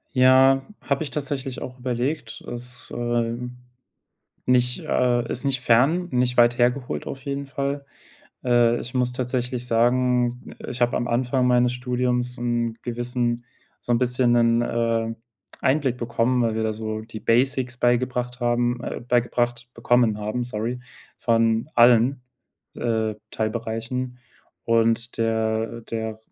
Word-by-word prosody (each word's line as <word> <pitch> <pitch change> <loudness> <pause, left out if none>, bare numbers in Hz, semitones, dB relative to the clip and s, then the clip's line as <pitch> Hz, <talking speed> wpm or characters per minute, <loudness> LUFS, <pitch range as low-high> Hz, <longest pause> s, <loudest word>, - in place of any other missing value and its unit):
Ja, 130 +1 +6 0.2
habe 140 +1 -1
ich 150 - -5
tatsächlich 135 -3 -4
auch 125 0 -7
überlegt. 125 +4 -3
Es, 125 +1 -7
ähm, 120 +1 -2 0.9
nicht 125 -1 +2
äh, 120 -1 +1
ist 125 - -2
nicht 135 -2 0
fern, 140 +10 +3
nicht 125 0 +1
weit 120 0 +5
hergeholt 125 - 0
auf 135 - -6
jeden 140 0 -3
Fall. 140 0 -3 0.6
Äh, 120 -1 +4
ich 120 - -7
muss 125 -1 +1
tatsächlich 125 -1 -2
sagen, 125 +1 +1
äh, - - -8
ich 125 0 -3
habe 120 - +2
am 120 - -2
Anfang 125 +2 +1
meines 125 0 +3
Studiums 125 0 -1
'n 120 -1 -1
gewissen 120 0 -2 0.4
so 120 - -2
'n 120 - +3
bisschen 125 0 +2
'nen, 115 -1 +4
äh, 115 -1 0 0.5
Einblick 135 -2 +2
bekommen, 120 +1 0
weil 115 -2 +1
wir 110 0 -1
da 110 -1 -1
so 110 0 -4
die 110 0 -9
Basics 125 +1 +1
beigebracht 125 0 0
haben, 120 0 +1
äh, - - -4
beigebracht 120 0 0
bekommen 115 -2 +2
haben, 110 +4 -2
sorry, 120 +1 -3 0.4
von 115 +2 +1
allen, 120 +2 +5 0.6
äh, 110 -2 -1 0.2
Teilbereichen 115 +3 -3 0.5
und 115 +1 +1
der 110 0 0
der 110 0 -4
r 110 - -11
120 Hz, 140 wpm, -24 LUFS, 115-125 Hz, 0.9 s, Ja